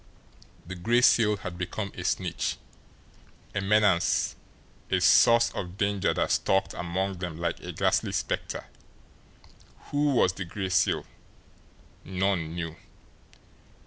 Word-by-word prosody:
The 95 - -7
Gray 115 +7 +2
Seal 105 -4 +4
had 90 -2 -7
become 95 +3 -4
a - - -7
snitch, - - -1 1.0
a 100 - -1
menace, 100 -3 +2 0.5
a - - +2
source 115 0 +5
of 90 0 -6
danger 100 -1 +1
that - - -1
stalked 95 0 +1
among 95 +2 -3
them 85 -3 -5
like 85 0 -2
a - - -7
ghastly - - +1
spectre. - - -3 1.3
Who 145 -1 +1
was 95 -6 +3
the 95 -1 -5
Gray 95 +2 -4
Seal? 90 - +1 1.0
None 90 -3 -1
knew. 80 -2 -5
95 Hz, 120 wpm, -27 LUFS, 90-105 Hz, 1.3 s, source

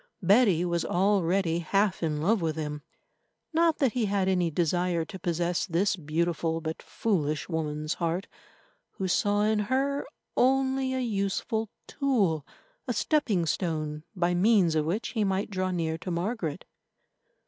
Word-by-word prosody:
Betty 195 -3 +4
was 170 -1 0
already 185 -2 +1
half 195 +3 +1
in 155 -2 -1
love 210 +3 +2
with 160 -2 -1
him. 150 -2 -4 0.7
Not 330 0 +3
that 270 -5 +2
he 245 -3 +1
had 200 -2 0
any 180 -3 +2
desire 170 +1 0
to 190 - -9
possess 175 +1 -1
this 190 +3 +1
beautiful 165 0 -1
but 160 0 -5
foolish 155 -9 -1
woman's 155 -2 -2
heart, 170 +4 -2 0.7
who 190 - -3
saw 205 +3 +2
in 215 0 +2
her 270 +6 0 0.3
only 265 0 +2
a - - -1
useful 220 0 -1 0.2
tool, 200 - 0 0.4
a - - 0
stepping 225 - +1
stone 155 -3 -2
by 175 -1 +1
means 185 -2 +4
of 155 -1 +1
which 190 +8 -1
he 220 -3 0
might 195 +1 -1
draw 185 -1 -1
near 165 -3 -2
to 185 - -6
Margaret. 175 -2 -2
180 Hz, 150 wpm, -28 LUFS, 165-210 Hz, 0.7 s, Betty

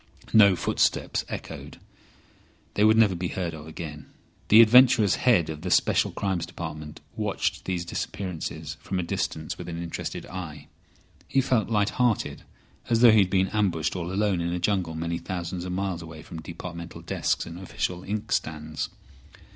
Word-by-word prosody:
No 100 -3 +7
footsteps - - +1
echoed. - - -7 1.0
They 105 - +2
would 110 +1 +6
never 110 -4 +5
be 90 0 -2
heard 85 -2 -3
of 80 -1 -9
again. 80 -2 -7 0.4
The 110 - +8
adventurous 115 -2 +7
head 115 -10 +3
of 75 -1 -6
the 90 - -3
Special 85 - +3
Crimes 95 -4 -2
Department 80 -4 -7
watched - - -1
these 90 -2 -2
disappearances 90 -1 -4
from 95 - -4
a 90 - 0
distance 80 -2 -3
with 90 -1 -6
an 85 -1 -5
interested 85 -1 -5
eye. 80 -6 -7 0.6
He 135 - +2
felt 125 -5 +1
light 105 -1 +2
hearted, 120 -4 +1 0.5
as 115 -1 +3
though 120 -2 +9
he 110 - +6
had 95 -2 +4
been 95 0 +2
ambushed 90 -7 0
all 90 -1 -3
alone 100 -2 +1
in 85 0 -1
a - - -1
jungle 90 -3 0
many 85 +1 -2
thousands 90 0 -4
of 90 - -4
miles 95 -2 -2
away 80 -1 -10
from 85 -2 -8
departmental 85 +1 -8
desks - - -1
and 85 +1 -8
official 90 -1 -3
inkstands. 80 -7 -2
90 Hz, 165 wpm, -26 LUFS, 85-100 Hz, 1.0 s, though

